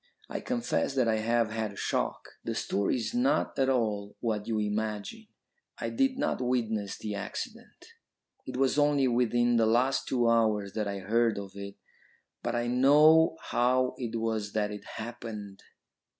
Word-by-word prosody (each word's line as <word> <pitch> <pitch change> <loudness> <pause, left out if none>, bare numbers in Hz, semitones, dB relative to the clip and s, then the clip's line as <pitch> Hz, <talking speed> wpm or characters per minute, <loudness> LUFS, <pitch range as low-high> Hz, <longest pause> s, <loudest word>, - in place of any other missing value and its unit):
I - - -4
confess 240 - -1
that 130 -3 +2
I 110 -1 +2
have 115 0 +1
had 110 -2 -3
a - - -14
shock. - - -2 0.2
The - - -3
story 100 0 0
is 125 - -3
not 245 - +1
at 135 0 +3
all 105 -5 -1
what 110 -3 -2
you 115 -2 0
imagine. 105 - -3 0.5
I - - -3
did 270 -1 +1
not 285 - -1
witness 110 -5 -1
the 105 -1 -5
accident; 100 -1 -7 0.6
it - - -5
was 135 +2 +2
only 145 -2 +3
within 120 0 +2
the 115 -1 +3
last 125 +4 +2
two 120 -2 +1
hours 110 -4 +2
that 105 -2 -2
I 100 0 -3
heard 115 +3 +1
of 100 -1 -6
it, 100 0 -8 0.7
but - - -2
I 120 0 0
know 150 +6 +5
how 125 +1 +2
it 115 -3 -4
was 110 -2 -2
that 105 -1 0
it 105 - -8
happened." 110 -3 -7
115 Hz, 165 wpm, -29 LUFS, 105-130 Hz, 0.7 s, know